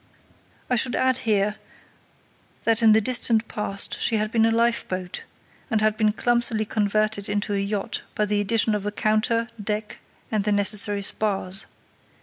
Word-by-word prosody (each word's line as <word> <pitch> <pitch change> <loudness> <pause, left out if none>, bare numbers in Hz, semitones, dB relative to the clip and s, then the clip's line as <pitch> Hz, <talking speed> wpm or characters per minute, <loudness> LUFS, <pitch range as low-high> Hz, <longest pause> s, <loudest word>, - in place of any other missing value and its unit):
I 250 - +1
should 245 +1 +2
add 260 0 +1
here 210 0 +1 1.1
that 230 0 +2
in 220 -1 +6
the 220 - +4
distant 230 -1 +1
past 200 -1 -1
she 225 - +2
had 215 0 -1
been 225 -1 +3
a - - +2
lifeboat, 225 -6 -1 0.5
and 220 - +1
had 215 0 +1
been 215 -1 +2
clumsily 235 -1 0
converted 215 0 -1
into 205 0 -2
a 200 - 0
yacht 200 0 -3
by 210 - +1
the 205 0 0
addition 220 +1 +1
of 205 -1 -3
a - - -2
counter, 215 +2 0 0.2
deck, 210 +1 -4 0.3
and 215 -2 0
the 210 - 0
necessary 205 0 +3
spars. 195 -2 0
215 Hz, 160 wpm, -23 LUFS, 205-225 Hz, 1.1 s, in